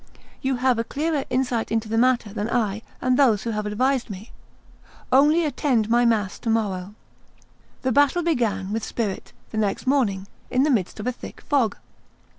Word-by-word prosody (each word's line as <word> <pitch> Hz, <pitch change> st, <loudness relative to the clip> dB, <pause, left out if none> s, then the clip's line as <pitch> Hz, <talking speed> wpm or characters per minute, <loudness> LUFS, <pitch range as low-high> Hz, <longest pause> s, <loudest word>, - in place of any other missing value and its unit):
You 265 Hz, -1 st, 0 dB
have 250 Hz, -1 st, +1 dB
a -, -, +1 dB
clearer 295 Hz, +2 st, -2 dB
insight 250 Hz, -3 st, -1 dB
into 225 Hz, 0 st, 0 dB
the 220 Hz, -, -2 dB
matter 235 Hz, -3 st, +2 dB
than 215 Hz, +1 st, -3 dB
I 220 Hz, -3 st, 0 dB, 0.2 s
and 255 Hz, 0 st, +2 dB
those 230 Hz, -8 st, +4 dB
who 230 Hz, -, -2 dB
have 210 Hz, -1 st, -2 dB
advised 255 Hz, +4 st, 0 dB
me. 205 Hz, +3 st, -9 dB, 0.8 s
Only 300 Hz, +5 st, +5 dB
attend 250 Hz, -6 st, 0 dB
my 240 Hz, +1 st, +4 dB
mass 215 Hz, -5 st, +1 dB
to 230 Hz, -, -3 dB
morrow." 205 Hz, -3 st, -1 dB, 0.9 s
The 260 Hz, -, +1 dB
battle 285 Hz, +7 st, +3 dB
began 215 Hz, -, 0 dB
with 225 Hz, -, -2 dB
spirit 210 Hz, -5 st, -3 dB, 0.2 s
the 220 Hz, -, -2 dB
next 205 Hz, +2 st, -1 dB
morning, 230 Hz, -9 st, +1 dB, 0.2 s
in 255 Hz, +1 st, +2 dB
the 300 Hz, -, +2 dB
midst 210 Hz, -4 st, -1 dB
of 210 Hz, -, -5 dB
a 250 Hz, -, +1 dB
thick 250 Hz, -, -10 dB
fog. 255 Hz, -8 st, +1 dB
235 Hz, 180 wpm, -23 LUFS, 210-265 Hz, 0.9 s, Only